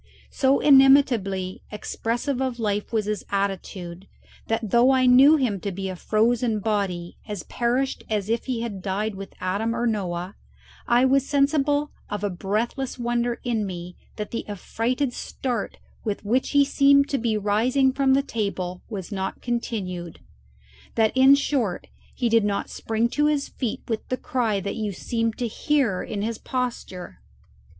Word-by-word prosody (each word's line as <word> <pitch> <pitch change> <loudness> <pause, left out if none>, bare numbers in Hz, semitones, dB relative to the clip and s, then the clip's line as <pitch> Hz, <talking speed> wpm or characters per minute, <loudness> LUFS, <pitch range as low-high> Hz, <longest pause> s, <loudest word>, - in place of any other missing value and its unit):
So 270 0 +3
inimitably 255 -10 +4
expressive 240 +5 -2
of 260 -2 -1
life 210 -3 -2
was 220 -3 0
his 210 -1 -2
attitude, 190 -2 -3 0.4
that 225 -2 -1
though 240 +2 +5
I 260 -1 +4
knew 265 +5 +7
him 245 -9 0
to 200 - -3
be 190 +1 -4
a 185 - -4
frozen 225 +3 +1
body 195 -5 -2
as 205 -4 -5
perished 250 +3 -1
as 210 -3 -1
if 230 +1 -1
he 245 -3 -1
had 210 -5 -5
died 205 +3 -2
with 195 0 -9
Adam 205 +5 -1
or 240 - -1
Noah, 185 -4 -2 0.5
I 245 +2 +4
was 270 +1 +2
sensible 290 +1 +2 0.2
of 205 0 -4
a 205 - 0
breathless 220 +9 -2
wonder 240 0 -1
in 230 -3 0
me 180 -1 -7 0.2
that 210 -1 -5
the 230 - -3
affrighted 245 +6 -2
start 245 -4 -4 0.3
with 210 -1 -3
which 245 +5 +1
he 285 -1 +4
seemed 280 0 +4
to 275 - 0
be 225 -2 0
rising 245 +6 +2
from 270 -1 +3
the 275 - +2
table 190 -7 -3
was 200 -3 -6
not 190 -1 -3
continued 190 -8 -3 0.8
that, 220 0 +2
in 265 +1 +7
short, 265 -9 -1 0.3
he 245 - 0
did 230 -1 +4
not 205 -1 -1
spring 225 +1 0
to 295 +4 +2
his 295 -2 0
feet 245 -5 -4
with 225 -3 -3
the 255 - 0
cry 230 -7 0
that 200 - -4
you 210 -2 -2
seemed 230 +4 -2
to 245 - -1
hear 240 -4 0
in 205 -1 -4
his 225 0 -3
posture. 240 -8 -4
225 Hz, 165 wpm, -24 LUFS, 200-260 Hz, 0.8 s, knew